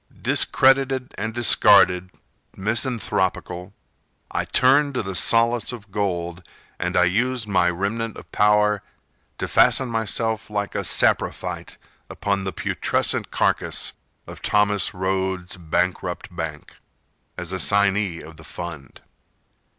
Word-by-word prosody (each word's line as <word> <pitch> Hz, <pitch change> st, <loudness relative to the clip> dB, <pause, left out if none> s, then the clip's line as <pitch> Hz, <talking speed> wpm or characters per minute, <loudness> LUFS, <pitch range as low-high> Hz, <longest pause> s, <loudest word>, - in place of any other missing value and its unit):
Discredited 135 Hz, -1 st, +3 dB
and 110 Hz, +2 st, -4 dB
discarded, 100 Hz, -5 st, +5 dB, 0.5 s
misanthropical, 100 Hz, -5 st, -2 dB, 0.6 s
I -, -, -2 dB
turned 140 Hz, +2 st, +3 dB
to 125 Hz, -, -1 dB
the 95 Hz, 0 st, -5 dB
solace 115 Hz, +4 st, +3 dB
of 110 Hz, -5 st, -11 dB
gold 90 Hz, -3 st, -3 dB, 0.4 s
And -, -, -2 dB
I 90 Hz, -, +5 dB
used 115 Hz, +6 st, 0 dB
my 90 Hz, -3 st, +2 dB
remnant 105 Hz, +6 st, -3 dB
of -, -, -13 dB
power 105 Hz, 0 st, +2 dB, 0.6 s
To -, -, -3 dB
fasten 130 Hz, -2 st, +3 dB
myself 115 Hz, 0 st, -1 dB
like 100 Hz, -1 st, -3 dB
a -, -, -2 dB
saprophyte -, -, 0 dB, 0.3 s
Upon 100 Hz, -1 st, -2 dB
the 95 Hz, -, -2 dB
putrescent -, -, -1 dB
carcass -, -, 0 dB, 0.3 s
Of -, -, -11 dB
Thomas 105 Hz, -3 st, +1 dB
Rhodes, 95 Hz, 0 st, -2 dB
bankrupt 90 Hz, +1 st, -3 dB
bank, 80 Hz, -3 st, -6 dB, 0.6 s
As 90 Hz, +1 st, -3 dB
assignee 100 Hz, -2 st, +2 dB
of 80 Hz, +1 st, -13 dB
the 80 Hz, -, -13 dB
fund. 80 Hz, -4 st, -9 dB
100 Hz, 115 wpm, -22 LUFS, 90-115 Hz, 0.6 s, discarded